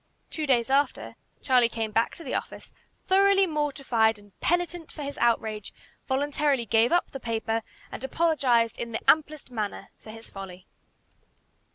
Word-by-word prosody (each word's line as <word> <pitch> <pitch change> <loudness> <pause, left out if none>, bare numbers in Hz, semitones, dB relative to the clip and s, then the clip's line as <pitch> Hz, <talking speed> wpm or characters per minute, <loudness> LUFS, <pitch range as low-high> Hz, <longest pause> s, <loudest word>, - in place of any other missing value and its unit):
Two 310 -2 -3
days 250 -1 +2
after, 280 +1 0 0.3
Charlie 250 -3 +4
came 225 -2 -3
back 225 +2 +1
to 335 - -10
the 265 - -5
office, - - -5 0.3
thoroughly 390 0 +4
mortified 275 - +1
and 205 0 -18
penitent 350 -1 -1
for 300 - -7
his 285 0 -5
outrage, 220 -3 0 0.4
voluntarily 280 -1 +1
gave 225 +2 +3
up 350 0 +2
the 270 - -6
paper, 225 -1 -2 0.3
and - - -7
apologized 265 -6 +1
in 235 -1 -5
the 225 - -5
amplest 305 -3 +2
manner 215 -4 -4
for - - -14
his 225 +1 -10
folly. 185 -2 -9
250 Hz, 155 wpm, -27 LUFS, 225-300 Hz, 0.4 s, Charlie